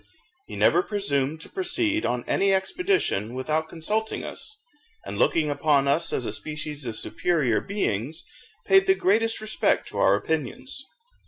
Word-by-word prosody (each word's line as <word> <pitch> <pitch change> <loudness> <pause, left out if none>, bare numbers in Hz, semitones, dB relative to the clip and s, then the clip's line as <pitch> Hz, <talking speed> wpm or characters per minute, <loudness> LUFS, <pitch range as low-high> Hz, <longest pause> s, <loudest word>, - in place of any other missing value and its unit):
He - - -8
never - - +4
presumed 160 - -1
to - - -9
proceed 345 -4 +1
on 125 -1 -2
any 195 0 +2
expedition 190 - 0
without 155 +4 -1
consulting 210 +7 -2
us, 430 0 -7 0.5
and 100 +1 -5
looking 155 -3 +2
upon 145 -1 +2
us 165 +4 +2
as 125 - -1
a - - -2
species 150 +4 -5
of 110 -2 -4
superior 150 -11 0
beings, 160 - -2 0.4
paid 390 0 +5
the 380 - +5
greatest 225 - +1
respect 215 0 +1
to - - -5
our - - +5
opinions. 150 - -3
160 Hz, 150 wpm, -25 LUFS, 135-220 Hz, 0.5 s, paid